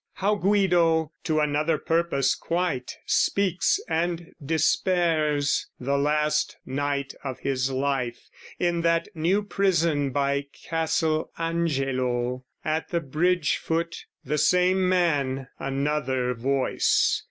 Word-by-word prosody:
How 200 +2 +1
Guido, 180 -6 +2
to 155 -1 +1
another 150 +2 +1
purpose 165 -5 +1
quite, 170 -7 -2
Speaks 195 -1 +2
and 170 +1 -2
despairs, 155 -2 +1
the 140 +2 -1
last 150 +2 +1
night 140 0 -2
of 130 -3 -5
his 135 -1 0
life, 130 -2 -1 0.4
In 175 -1 0
that 165 +1 +1
New 180 +5 +1
Prison 170 -8 +1
by 140 +1 0 0.2
Castle 160 -1 0
Angelo 130 -7 -1 0.2
At 155 +1 -1
the 170 -3 0
bridge 165 +2 +1
foot: 170 +1 -3 0.2
the 150 +3 0
same 180 +2 +3
man, 140 -8 +1
another 135 -2 -1
voice. 130 +3 +1
155 Hz, 110 wpm, -25 LUFS, 140-170 Hz, 0.4 s, same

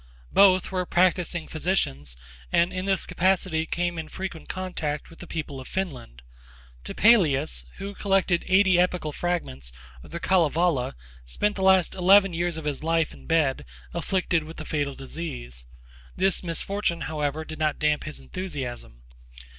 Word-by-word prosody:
Both 190 -2 +5
were 180 -1 -1
practising 175 -2 +1
physicians, 75 - -1 0.3
and 170 +1 +3
in 185 0 -3
this 195 -2 +1
capacity 180 -3 +1
came 175 -1 -1
into 160 - -6
frequent 185 -4 -6
contact 170 -6 -4
with 165 - -15
the 175 - -9
people 145 -5 -5
of 130 - -9
Finland. 125 - -5 0.6
Topelius, 140 - +3
who 200 +1 -6
collected 195 -3 +1
eighty 190 -1 +5
epical 180 -4 +1
fragments 140 - -3 0.3
of - - -14
the 170 - -5
Kalevala, 165 - +2 0.3
spent 135 - -1
the 195 - -4
last 190 -2 +4
eleven 195 +1 +5
years 170 0 -1
of 160 - -6
his 145 -1 -3
life 165 -1 +1
in - - -15
bed, 155 -5 +2 0.3
afflicted 180 -4 0
with 160 +1 -10
a 155 - -6
fatal 145 -3 -2
disease. 60 - -7 0.5
This 190 0 +2
misfortune, 170 0 -2
however, 155 0 -2
did 155 0 -8
not 155 -1 +1
damp 150 -1 +1
his 155 - -6
enthusiasm. 125 - -6
165 Hz, 150 wpm, -26 LUFS, 150-185 Hz, 0.6 s, Both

